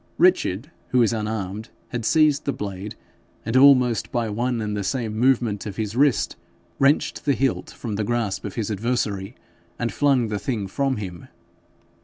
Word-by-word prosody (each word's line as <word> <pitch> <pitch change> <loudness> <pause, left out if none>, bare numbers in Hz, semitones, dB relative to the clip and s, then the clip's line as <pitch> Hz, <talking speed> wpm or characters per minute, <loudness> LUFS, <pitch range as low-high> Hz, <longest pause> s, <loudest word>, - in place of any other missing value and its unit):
Richard, 150 - +2 0.2
who 130 - 0
was 115 -2 +4
unarmed, 105 -1 -3 0.2
had 120 -2 -4
seized 155 -1 +3
the 140 - +1
blade, 100 -3 -6 0.5
and, 110 +3 -2
almost 130 -4 +5
by 120 -3 -1
one 120 +3 -1
and 105 -1 -2
the 100 - -2
same 115 0 -2
movement 115 -4 +1
of 100 - -6
his 110 -1 -3
wrist, 140 0 +2 0.4
wrenched 140 +2 +2
the 140 - +2
hilt 135 0 0
from 110 -4 -5
the 110 - 0
grasp 115 -3 -1
of 100 - -6
his 110 -2 -2
adversary, 105 -1 -2 0.4
and 120 -1 -2
flung 135 -6 +2
the 105 -1 -2
thing 110 -5 -2
from 135 +6 -1
him. 90 -5 -7
115 Hz, 170 wpm, -23 LUFS, 105-130 Hz, 0.5 s, almost